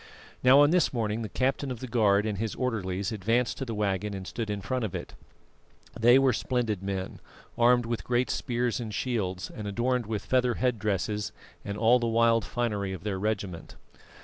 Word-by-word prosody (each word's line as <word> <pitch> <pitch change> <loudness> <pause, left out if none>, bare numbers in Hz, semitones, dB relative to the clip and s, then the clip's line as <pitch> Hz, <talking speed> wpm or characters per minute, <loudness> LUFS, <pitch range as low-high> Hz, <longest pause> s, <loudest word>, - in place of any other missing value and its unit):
Now, 130 +3 +7
on 145 +1 +5
this 180 -2 +3
morning 110 -2 -1
the 110 - -4
captain 135 +2 -1
of 125 -3 -5
the 130 - -5
guard 105 -4 +3
and 105 -3 -2
his 110 -1 -2
orderlies 100 -5 -2
advanced 115 +4 0
to 135 - -2
the 115 -3 -4
waggon 100 0 -1
and 95 -1 -6
stood 115 +2 -4
in 105 -1 -2
front 130 +4 -2
of 105 - -3
it. - - -6 0.8
They 120 +3 +5
were 135 -2 +4
splendid 115 -4 -1
men, 95 -1 -4 0.4
armed 120 0 +4
with 115 0 -3
great 125 +1 0
spears 120 0 -1
and 115 -3 -5
shields, 100 -6 -2
and 105 -1 -6
adorned 120 +3 0
with 110 -2 -3
feather 125 -2 +2
head 125 -3 0
dresses 105 0 -1 0.3
and 100 0 -5
all 115 +3 +5
the 120 - -1
wild 115 0 +3
finery 105 -4 -2
of 95 - -8
their 100 -3 -2
regiment. 100 -5 -3
115 Hz, 195 wpm, -28 LUFS, 100-125 Hz, 0.8 s, Now